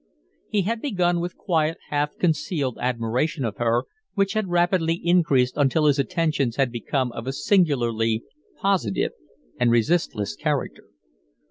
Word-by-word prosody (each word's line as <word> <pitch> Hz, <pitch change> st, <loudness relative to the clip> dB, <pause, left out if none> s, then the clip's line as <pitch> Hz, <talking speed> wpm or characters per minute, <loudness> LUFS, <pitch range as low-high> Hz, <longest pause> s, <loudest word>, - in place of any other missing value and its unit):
He 205 Hz, -2 st, +1 dB
had 225 Hz, +4 st, -2 dB
begun 180 Hz, -10 st, +1 dB
with 175 Hz, +1 st, -4 dB
quiet, 160 Hz, -3 st, 0 dB
half 145 Hz, 0 st, -1 dB
concealed 155 Hz, -, -1 dB
admiration 125 Hz, +4 st, -1 dB
of 105 Hz, -3 st, -4 dB
her, 120 Hz, +1 st, +1 dB, 0.3 s
which 195 Hz, -1 st, +1 dB
had 215 Hz, -3 st, -1 dB
rapidly 175 Hz, -1 st, +2 dB
increased 160 Hz, -8 st, +2 dB
until 145 Hz, +2 st, +2 dB
his 145 Hz, -1 st, +3 dB
attentions 140 Hz, -5 st, 0 dB
had 135 Hz, -3 st, +1 dB
become 125 Hz, +2 st, -1 dB
of 115 Hz, +1 st, -7 dB
a -, -, 0 dB
singularly 120 Hz, -, +1 dB, 0.4 s
positive 190 Hz, -, +1 dB, 0.5 s
and 125 Hz, -, +3 dB
resistless 115 Hz, -, +1 dB
character. -, -, -2 dB
150 Hz, 135 wpm, -24 LUFS, 120-175 Hz, 0.5 s, his